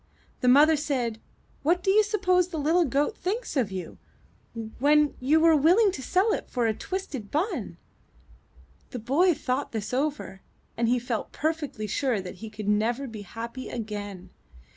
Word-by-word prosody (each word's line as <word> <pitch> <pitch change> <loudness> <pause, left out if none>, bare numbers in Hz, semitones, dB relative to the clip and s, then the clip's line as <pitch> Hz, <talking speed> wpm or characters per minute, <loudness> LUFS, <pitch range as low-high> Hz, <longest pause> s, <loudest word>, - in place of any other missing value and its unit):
The 250 - 0
mother 295 +5 +7
said: 255 -7 -2 0.4
''What 345 +4 +2
do 385 - +3
you 425 +2 +6
suppose 375 -4 +2
the 345 -3 -6
Httle 320 +1 +2
goat 285 - +1
thinks 430 +4 -3
of 240 -8 +1
you, 185 -3 -6 0.8
when 295 +2 +4
you 290 +5 +3
were 325 0 +5
willing 360 +8 +5
to 280 - -6
sell 380 - +2
it - - -4
for 245 -2 0
a 220 - +2
twisted 275 - -5
bun?*' 345 +9 -2 1.1
The 250 - -6
boy 295 +10 +2
thought 270 -1 -2
this 215 +1 -4
over, 270 -8 -2 0.3
and 230 0 +1
felt 235 -3 -3
perfectly 305 -8 -2
sure 240 +2 0
that 185 -1 -8
he 220 - -6
could 215 -1 -7
never 225 +6 +1
be 225 -5 -8
happy 230 +6 -7
again. 205 -5 -6
275 Hz, 165 wpm, -26 LUFS, 225-325 Hz, 1.1 s, mother